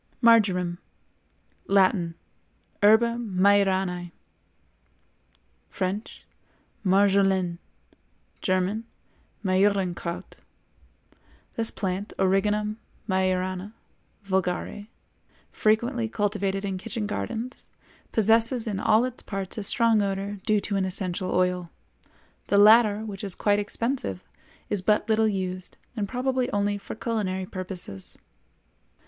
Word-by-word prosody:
MARJORAM. 185 -7 +4 0.9
Latin—Herba 200 +4 +1
majoranæ; 190 -4 +1 1.6
French—Marjolaine; 195 -1 -1 0.8
German—Majorankraut. 185 -2 -2 1.2
This 225 -1 +1
plant, 190 +1 -4
Origanum 210 +3 +1 0.3
Majorana 185 +1 -1 0.5
(vulgare), 190 +1 -2 0.6
frequently 225 +2 +1
cultivated 200 -2 -1
in 190 -2 -3
kitchen 215 +3 -4
gardens, 230 +4 -5 0.4
possesses 225 +2 +3
in 205 -4 -2
all 220 +2 +3
its 255 -1 -5
parts 195 +1 -5
a - - -4
strong 225 +1 +3
odor 200 0 -3
due 215 -1 +3
to 200 0 -2
an 195 - +1
essential 185 -1 -1
oil. 180 -1 0 0.8
The 200 - +2
latter, 215 0 +6
which 200 -2 -7
is 195 -3 -4
quite 205 -1 +2
expensive, 210 - 0 0.4
is 205 -3 -1
but 210 +3 +2
little 220 0 +3
used, 185 -3 -4 0.2
and 205 -3 -3
probably 255 0 -1
only 205 0 0
for 195 - -8
culinary 205 -5 -2
purposes. 185 - -6
200 Hz, 90 wpm, -26 LUFS, 185-215 Hz, 1.6 s, latter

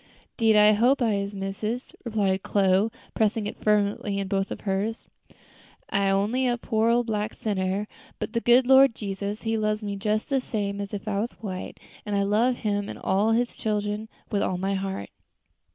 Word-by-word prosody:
"'Deed 225 -2 +3
I 210 0 +7
hope 240 +6 +3
I 230 -4 +2
is, 200 0 -2
missus," 210 +5 -4
replied 205 -5 0
Chloe, 195 +2 +2 0.2
pressing 220 -1 +1
it - - -6
fervently 205 -1 +1
in 195 -1 -2
both 195 0 -1
of - - -6
hers. 205 +3 -2 0.8
"I's 195 -1 +2
only 225 +7 +1
a 240 -1 +1
poor 225 -1 +1
old 240 +1 +3
black 215 -1 -2
sinner, 195 -1 -1 0.3
but - - -4
de 230 - 0
good 245 +2 +5
Lord 265 -2 +6
Jesus, 200 0 -4
He 225 -1 0
loves 215 0 0
me 200 -1 -3
jes 215 0 0
de 275 -1 +1
same 205 -5 -3
as 200 - -5
if 205 +1 -6
I 200 -2 0
was 230 +4 -2
white, 190 -4 -7 0.2
an' 205 -1 -3
I 200 - +2
love 220 +5 +2
Him 205 -3 -2
an' - - -6
all 205 +4 +1
His 240 +1 0
chillen 210 0 -2 0.2
with 200 -2 +1
all 185 - 0
my 195 +2 -1
heart." 190 - -4
210 Hz, 190 wpm, -26 LUFS, 200-225 Hz, 0.8 s, I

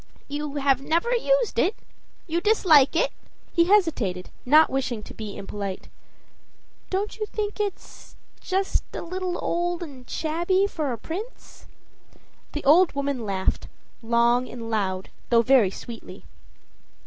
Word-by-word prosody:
"You 290 0 -4
have 275 -2 +2
never 335 - 0
used - - +1
it; 410 - +2 0.5
you 340 0 -1
dislike 340 -9 +5
it?" 330 - +2 0.4
He 340 -1 +4
hesitated, 310 - +1 0.2
no; 305 +4 +7
wishing 255 -5 -2
to - - -11
be 215 -2 -7
impolite. 200 -1 -6 1.0
"Don't 405 +4 -2
you 425 - -2
think 420 0 -4
it's 410 -2 -5 0.2
just 380 +1 -1
a - - -4
little 365 +1 -3
old 345 0 -1
and 265 -6 -11
shabby 345 +5 +1
for 310 -8 -2
a 235 - -3
prince?" 380 - -8 0.9
The 295 - -4
old 325 +5 +5
woman 280 -5 -2
laughed 190 -1 -1 0.3
long 235 +2 +2
and 230 -2 -7
loud, 190 -3 -1 0.2
though 235 -1 +5
very 245 -6 +5
sweetly. 230 +4 -10
295 Hz, 135 wpm, -25 LUFS, 235-370 Hz, 1.0 s, no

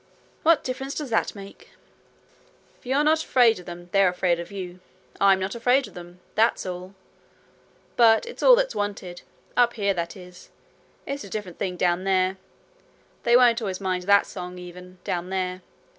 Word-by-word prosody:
'What 330 -1 +4
difference 265 +2 -4
does 290 -5 -5
that 225 - 0
make?' 195 -1 -12 1.1
'If - - -17
you're 275 +3 +2
not 315 +1 +3
afraid 240 -8 +4
of 180 - -14
them, 175 0 -9
they're 195 -2 +4
afraid 180 -1 0
of 170 - -7
you. 185 -2 -7 0.4
I'm 195 -1 +5
not 190 +1 -3
afraid 245 +2 +2
of 205 - -15
them. 175 0 -12
That's 225 +2 +2
all. 185 +1 -7 1.0
But 225 -2 +5
it's 475 - -9
all - - +8
that's - - 0
wanted 200 -4 -4 0.3
up 240 -1 +4
here, 200 -3 0
that 170 +2 -4
is. 180 -1 -14 0.6
It's 275 -2 -4
a 200 - -10
different 190 -4 -6
thing 180 -2 -3
down 175 0 +1
there. 190 0 +1 0.9
They 235 +1 +6
won't 240 -2 +4
always 190 -4 -3
mind 185 -2 -2
that 200 +1 +5
song 180 -1 -8
even, 180 +1 -11
down 175 0 -3
there. 185 -1 -3
195 Hz, 175 wpm, -24 LUFS, 180-235 Hz, 1.1 s, all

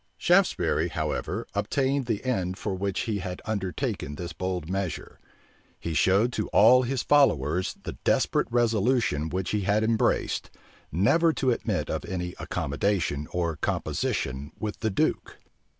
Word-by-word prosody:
Shaftesbury, 95 - +2
however, 80 -3 -3
obtained 135 -1 0
the 110 0 -2
end 95 -7 -1
for 100 - -3
which 95 0 -2
he 110 -3 -2
had 90 -1 -5
undertaken 95 -8 -3
this 85 +1 -6
bold 90 -1 -3
measure: 95 -3 -4 0.6
he 85 - -4
showed 100 - +3
to 105 - -2
all 125 +5 +6
his 130 0 -1
followers 90 - +3
the - - -5
desperate - - +2
resolution 115 - +1
which 95 +1 -2
he 105 - 0
had 105 +3 +2
embraced, 110 0 +1 0.4
never 160 - +3
to 130 -4 +1
admit 115 - -1
of - - -2
any 90 -1 -4
accommodation 75 -1 -1
or 85 -3 -1
composition 65 +2 -2
with 105 -1 -4
the 110 - 0
duke. 95 - -1
95 Hz, 140 wpm, -27 LUFS, 85-115 Hz, 0.6 s, all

